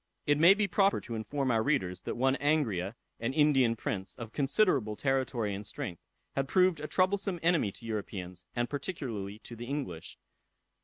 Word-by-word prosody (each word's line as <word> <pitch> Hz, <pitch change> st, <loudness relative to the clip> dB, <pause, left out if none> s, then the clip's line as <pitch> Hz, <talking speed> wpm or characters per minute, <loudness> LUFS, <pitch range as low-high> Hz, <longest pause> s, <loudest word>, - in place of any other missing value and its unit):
It 145 Hz, 0 st, +3 dB
may 175 Hz, +5 st, +8 dB
be 210 Hz, -1 st, +1 dB
proper 195 Hz, +2 st, +3 dB
to 115 Hz, -, -7 dB
inform 130 Hz, +5 st, -1 dB
our 110 Hz, -1 st, +3 dB
readers, 95 Hz, -9 st, 0 dB
that -, -, -2 dB
one 130 Hz, +2 st, +3 dB
Angria, 115 Hz, -, +1 dB, 0.2 s
an 115 Hz, +3 st, -1 dB
Indian 135 Hz, -6 st, +4 dB
prince, 95 Hz, -4 st, -4 dB
of 115 Hz, -2 st, -8 dB
considerable 140 Hz, -, +2 dB
territory 130 Hz, -5 st, 0 dB
and 100 Hz, +1 st, -5 dB
strength, 90 Hz, -4 st, -6 dB, 0.3 s
had 135 Hz, 0 st, 0 dB
proved 185 Hz, +1 st, +3 dB
a 150 Hz, -, -4 dB
troublesome 190 Hz, 0 st, +1 dB
enemy 165 Hz, -, +3 dB
to 115 Hz, -, -10 dB
Europeans, 95 Hz, -5 st, -5 dB
and 120 Hz, 0 st, 0 dB
particularly 125 Hz, -, -4 dB
to 120 Hz, -, -9 dB
the 120 Hz, +1 st, -7 dB
English. 125 Hz, -, -5 dB
130 Hz, 170 wpm, -31 LUFS, 105-150 Hz, 0.3 s, may